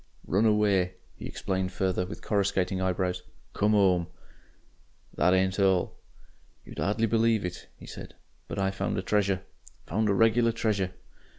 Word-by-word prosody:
"Run 105 +4 +2
away," 100 -4 +2 0.2
he - - -7
explained 95 -1 -2
further, 90 -1 -1
with 95 - -9
coruscating 95 -2 0
eyebrows. 90 0 -1 0.3
"Come 105 +1 +2
'ome. 90 -4 +3 1.1
"That 90 +1 +3
ain't 95 +1 +1
all. 95 -2 +2 0.7
"You'd - - -10
'ardly 105 +8 +1
believe 115 -2 +2
it," 90 0 -6
he - - -12
said, - - -10 0.3
"but - - -6
I 95 0 +1
found 95 - -2
a 95 - -2
treasure. 100 -2 +1 0.4
Found 105 +4 0
a 100 - +2
regular 115 +2 +3
treasure." 100 -5 -1
95 Hz, 150 wpm, -28 LUFS, 95-105 Hz, 1.1 s, ome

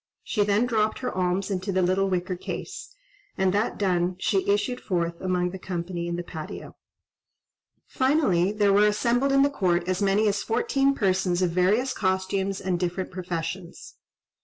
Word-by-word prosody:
She 210 - 0
then 205 +3 +2
dropped 220 -3 +1
her 250 - -4
alms 185 +2 0
into 190 +1 -2
the 185 -1 +1
little 190 +2 +2
wicker 185 0 -1
case—and 410 - -5
that 205 +3 0
done, 180 -2 +1
she 195 +1 0
issued 230 +5 0
forth 170 -3 -2
among 180 -1 0
the 190 - -7
company 175 -1 -4
in 170 - -2
the 175 - -4
patio. 160 -3 -8 1.1
Finally 260 - +2
there 205 -2 +3
were 205 +1 +5
assembled 240 +6 +1
in 275 0 +5
the 285 - +3
court 175 -7 0
as 185 +1 -1
many 200 +2 +3
as 205 0 +1
fourteen 275 +4 +1
persons 185 -3 +1
of 175 - +1
various 205 +9 +2
costumes 190 0 -1
and 185 -2 -1
different 180 +1 -2
professions. 175 -1 -5
190 Hz, 160 wpm, -25 LUFS, 180-210 Hz, 1.1 s, were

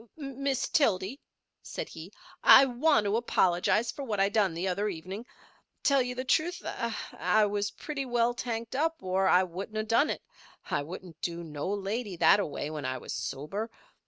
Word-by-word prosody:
"Miss 275 -2 -2
Tildy," 220 - +1 0.4
said - - -6
he, - - -10 0.3
"I 270 - +9
want 270 0 +3
to 205 +2 +2
apologise 215 0 +2
for 280 - -7
what 215 -6 -2
I 195 0 +4
done 200 -5 +1
the 175 +3 -2
other 200 +3 0
evenin'. 190 +5 -6 0.6
Tell 275 -2 +4
you 250 0 -3
the 255 +1 -4
truth, 335 +6 +1
I 225 -2 0
was 205 0 -1
pretty 280 +1 -5
well 240 0 +2
tanked 235 -1 -4
up 320 0 0
or 190 +1 +1
I 185 - +5
wouldn't 190 +4 -6
of 215 0 -2
done 235 +8 +3
it. - - -3 0.5
I - - +1
wouldn't 170 +1 -9
do 170 0 -3
no 150 +1 -5
lady 205 +1 -3
that 200 - +6
a 200 - +1
way 145 0 -4
when 150 -2 -5
I 130 0 -2
was - - -6
sober. 175 +12 -4
210 Hz, 185 wpm, -29 LUFS, 185-250 Hz, 0.6 s, I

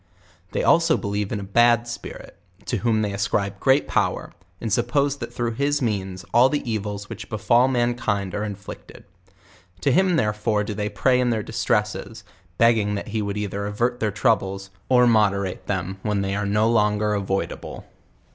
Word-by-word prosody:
They - - 0
also 165 -1 +4
believe 100 0 -3
in 105 - -2
a - - -6
bad 120 +4 +3
spirit, 120 - -8 0.3
to - - -1
whom 110 -2 +1
they 100 -1 -2
ascribe 100 0 -1
great 135 +2 +3
power, - - -1 0.3
and 115 - -4
suppcso 140 +6 +1
that - - -6
through 120 -1 -2
his 140 +5 0
means 95 -6 -3
all 125 +3 +6
the 145 -3 -2
evils 105 -2 -3
which 115 -1 -8
befal 120 +3 +3
mankind 120 -6 0
are 105 - -2
in 105 -2 -4
flicted. 100 +1 -11 0.8
To - - +2
him 185 -1 +3
therefore 105 -4 0
do 105 - -4
they 105 0 -2
pray 125 +5 +2
in 125 -1 +2
their 110 -3 0
distresses, 110 +1 -2 0.3
begg 115 0 +5
ing 105 0 -1
that 100 - -5
he 110 +1 -1
would 100 0 -3
either 100 0 -3
avert 120 +4 -1
their 105 -1 0
troubles^or 100 +2 +1
moder 105 -4 +3
ate 90 - -7
them 95 0 -3
when 105 -1 -1
they 95 0 -2
fire 100 0 -1
no 105 +2 +2
longer 105 -2 +2
avoidable. 95 -1 -3
105 Hz, 180 wpm, -23 LUFS, 100-120 Hz, 0.8 s, all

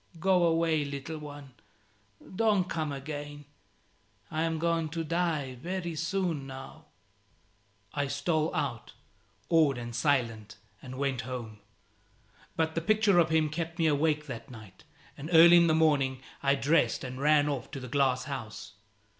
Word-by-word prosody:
"Go 185 0 +3
away, 165 -2 +2
little 140 +2 -6
one, 145 -2 -10 0.8
Don't 205 -4 +2
come 155 -4 -2
again: 145 +1 -7 0.9
I 155 0 -1
am 165 0 0
going 165 -1 0
to 165 +1 -3
die 160 -6 -1
very 175 0 -3
soon 170 -3 -2
now." 135 0 -10 1.1
I 145 -1 -1
stole 155 +3 0
out, - - -3 0.5
awed 155 -5 +3
and 120 -1 -6
silent, 115 -6 0 0.3
and 130 -1 -9
went 135 -3 -1
home. 115 -3 -7 1.0
But 160 -1 0
the 165 - -1
picture 210 0 +3
of 165 - +3
him 160 -1 +2
kept 165 +2 -4
me 165 - +1
awake 150 0 +1
that 125 -2 -8
night, 110 -6 -13 0.3
and 150 +3 -8
early 170 +1 +9
in 170 0 +5
the 160 - +3
morning 140 -5 +2 0.2
I 140 0 +3
dressed 145 +4 +1
and 130 0 -6
ran 150 0 +4
off 140 -5 -3
to 135 - -6
the 130 - -8
glass 130 -1 +1
house. 130 -7 -7
150 Hz, 150 wpm, -29 LUFS, 135-165 Hz, 1.1 s, early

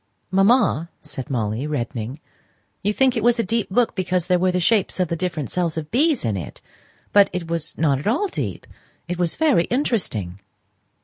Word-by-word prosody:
"Mamma," 195 - +3
said 130 -4 -6
Molly, 115 +1 -1
reddening, 120 -2 -4 0.6
"you 205 - +1
think 260 +3 +2
it 225 - 0
was 240 +1 +4
a 230 - +1
deep 225 +2 -1
book 235 +5 +2
because 180 -2 -1
there 180 -1 +2
were 185 +1 +2
the 180 - 0
shapes 195 +1 +1
of 180 -3 +1
the 170 - -1
different 165 -4 -3
cells 170 -3 0
of 155 -1 -5
bees 290 - +2
in 110 -3 0
it! 85 -6 -6 0.5
but 200 -1 +6
it 180 -2 -4
was 165 -1 -4
not 145 -4 +2
at 145 - -5
all 275 - +2
deep. 390 - -4 0.4
It 175 0 -4
was 175 -2 0
very 290 - +3
interesting." 180 - -1
180 Hz, 190 wpm, -22 LUFS, 150-225 Hz, 0.6 s, but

